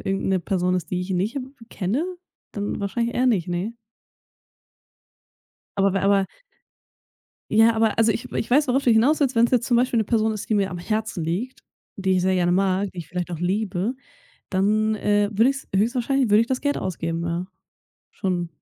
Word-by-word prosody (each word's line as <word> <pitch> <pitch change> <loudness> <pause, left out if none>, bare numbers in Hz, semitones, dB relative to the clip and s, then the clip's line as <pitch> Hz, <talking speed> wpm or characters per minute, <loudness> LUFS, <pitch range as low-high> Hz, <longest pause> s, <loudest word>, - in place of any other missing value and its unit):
irgend 195 0 -1
'ne 190 - +2
Person 180 +1 0
ist, 165 -3 -5
die 180 - -1
ich 180 +2 -5
nicht, 190 +7 0
äh, - - 0 0.3
kenne, 220 - -1 0.5
dann 205 0 -3
wahrscheinlich 230 +4 -2
eher 255 +1 +2
nicht, 190 -8 +1
ne. 190 +7 -3 2.0
Aber 195 0 +3
bei 195 - 0
aber 195 -1 +3 1.2
Ja, 225 +1 +5
aber 220 -1 +2
also, 225 0 +4
ich 225 - -4
ich - - -3
weiß, 290 +4 +4
worauf 265 +2 +1
du 245 - +3
hinaus 255 +8 +4
willst. 265 -4 +1
Wenn's 235 +2 +4
jetzt 245 -1 +2
zum 240 - +3
Beispiel 245 -1 +2
'ne 220 - +2
Person 220 0 +1
ist, 215 - -6
die - - +3
mir 200 -2 +1
am 175 - -5
Herzen 215 -1 -2
liegt, 210 +11 -3 0.3
die 190 -1 0
ich 180 - +1
sehr 185 0 +2
gerne 175 -1 +2
mag, 190 +1 +1
die 180 - -12
ich 165 - -7
vielleicht 180 0 -4
auch 170 - -4
liebe, 195 +4 -1 0.6
dann, 215 +3 +2
äh, 205 0 +1
würde 225 +6 +4
ich's 275 +1 -4
höchstwahrscheinlich 245 +4 +1
würde 210 +2 +6
ich 230 - -1
das 260 0 -1
Geld 285 0 0
ausgeben. 165 -2 -3
Ja, 170 +2 -2 0.6
schon. 180 -3 -2
205 Hz, 195 wpm, -23 LUFS, 185-230 Hz, 2.0 s, würde